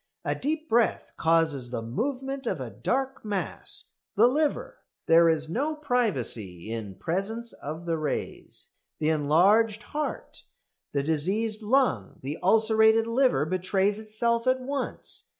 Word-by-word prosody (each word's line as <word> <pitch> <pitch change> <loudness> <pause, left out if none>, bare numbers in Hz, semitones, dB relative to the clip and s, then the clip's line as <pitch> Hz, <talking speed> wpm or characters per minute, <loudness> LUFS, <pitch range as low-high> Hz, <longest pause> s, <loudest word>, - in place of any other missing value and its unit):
A - - +1
deep 310 +3 -3
breath 235 -3 +1
causes 160 -6 +1
the 120 -2 -4
movement 265 - -3
of - - -1
a - - -5
dark 270 +1 -2
mass 205 -3 -4 0.2
the 220 +3 +6
liver. 290 +4 0 0.3
There 165 0 +6
is 160 -1 +1
no 285 - -1
privacy 130 - -1
in 110 -4 -5
presence 200 - -3
of 155 +4 -7
the 165 -2 -1
rays. 150 -2 -4 0.3
The 155 - 0
enlarged 195 +9 +3
heart, 300 0 -5 0.5
the 140 -1 0
diseased 195 +9 +1
lung, 215 - +1
the 140 +4 -4
ulcerated 220 +2 +5
liver 230 - +2
betrays 190 +4 0
itself 230 +2 -1
at 255 0 +3
once. 275 +2 -4
210 Hz, 135 wpm, -27 LUFS, 155-245 Hz, 0.5 s, the